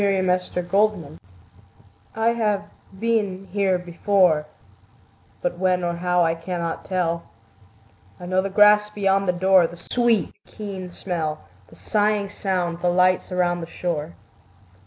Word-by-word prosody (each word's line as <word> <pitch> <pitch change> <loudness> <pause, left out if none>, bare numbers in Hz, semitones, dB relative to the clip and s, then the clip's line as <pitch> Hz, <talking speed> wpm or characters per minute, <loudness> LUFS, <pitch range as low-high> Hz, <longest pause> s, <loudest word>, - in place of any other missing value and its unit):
Y 200 -1 +2 0.2
Z 180 - -14
Sudden 175 -1 -3
Light 200 - +1 1.0
I 225 +1 +2
HAVE 215 -4 0 0.4
been 205 -4 -1
here 195 -2 +1
before, 175 -3 +1 1.0
But - - -2
when 185 -1 +1
or 170 0 0
how 180 0 +2
I 165 - +2
cannot 170 0 -4
tell: 170 -3 -2 0.9
I 180 - -8
know 185 +1 +1
the 195 - -3
grass 210 +1 +5
beyond 195 -2 +1
the - - +4
door, 185 -1 +4
The 175 - -12
sweet, 235 +5 0
keen 195 -3 -7
smell, 165 - -3 0.3
The - - -17
sighing 210 -1 0
sound, 180 -4 -2
the 180 - +2
lights 185 +1 +2
around 175 -1 0
the 165 - -6
shore. 165 -2 -4
185 Hz, 140 wpm, -23 LUFS, 175-205 Hz, 1.0 s, grass